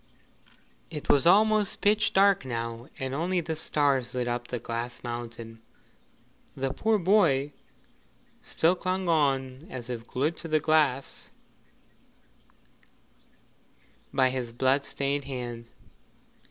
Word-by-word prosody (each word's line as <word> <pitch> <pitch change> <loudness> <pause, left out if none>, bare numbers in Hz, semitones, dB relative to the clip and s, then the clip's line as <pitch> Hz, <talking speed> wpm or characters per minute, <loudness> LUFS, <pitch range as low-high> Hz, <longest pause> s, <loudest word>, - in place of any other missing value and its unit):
It 150 - -7
was 145 +4 +4
almost 215 +2 +4
pitch 210 +1 +2
dark 195 -3 +4
now, 115 -1 -5
and 130 0 -4
only 175 +5 0
the 160 -1 -3
stars 140 -5 0
lit 125 -1 -1
up 120 0 -3
the 125 - -3
Glass 115 +1 -5
Mountain. 115 -1 -7 1.0
The 135 0 -2
poor 220 +7 +2
boy 165 -8 +3 0.9
still 165 +2 +2
clung 185 0 -2
on 135 -3 0
as 125 -1 -6
if 115 -1 -6
glued 150 +6 -1
to 165 - -5
the 155 -1 +2
glass 150 -4 +1 2.8
by 130 -1 +3
his 125 -2 -3
blood 130 +3 +1
stained 140 0 -1
hands. 120 -3 -6
135 Hz, 115 wpm, -27 LUFS, 120-165 Hz, 2.8 s, was